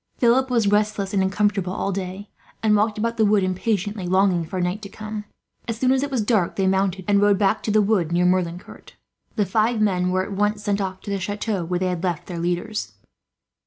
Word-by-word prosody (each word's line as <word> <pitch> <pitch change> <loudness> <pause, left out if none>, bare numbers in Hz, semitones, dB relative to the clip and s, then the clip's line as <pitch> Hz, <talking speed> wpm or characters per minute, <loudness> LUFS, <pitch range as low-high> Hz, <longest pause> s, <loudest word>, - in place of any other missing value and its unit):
Philip 255 +2 +3
was 235 -3 +2
restless 205 -1 +1
and 195 - +2
uncomfortable 195 -1 0
all 195 - -2
day, 190 +1 -5 0.4
and 215 -1 +4
walked 210 +1 +1
about 230 +2 -1
the 220 - +3
wood, 205 -2 +3
impatiently 195 +1 -1
longing 185 -1 +2
for 185 +2 -4
night 180 +4 -1
to 200 - -8
come. 215 0 -7 0.4
As 230 -1 -3
soon 255 +2 +2
as 265 0 +2
it 285 - -2
was 260 -4 0
dark 205 -5 +1
they 195 - 0
mounted, 190 -1 0
and 200 -1 +3
rode 205 -1 +4
back 200 +2 +1
to - - -4
the 215 0 +4
wood 195 -6 +1
near 175 +1 +2
Merlincourt. 180 -1 -2 0.4
The 210 - +1
five 220 +4 +1
men 185 -4 +1
were 185 +1 +1
at 205 - -7
once 205 +1 0
sent 205 -1 0
off 190 -1 -4
to 200 - -6
the 200 - -1
chateau 205 0 -2
where 180 +1 -1
they 185 +1 0
had 180 -2 -3
left 175 -4 -2
their 175 -2 -6
leaders. 175 +5 -2
200 Hz, 225 wpm, -23 LUFS, 185-215 Hz, 0.4 s, and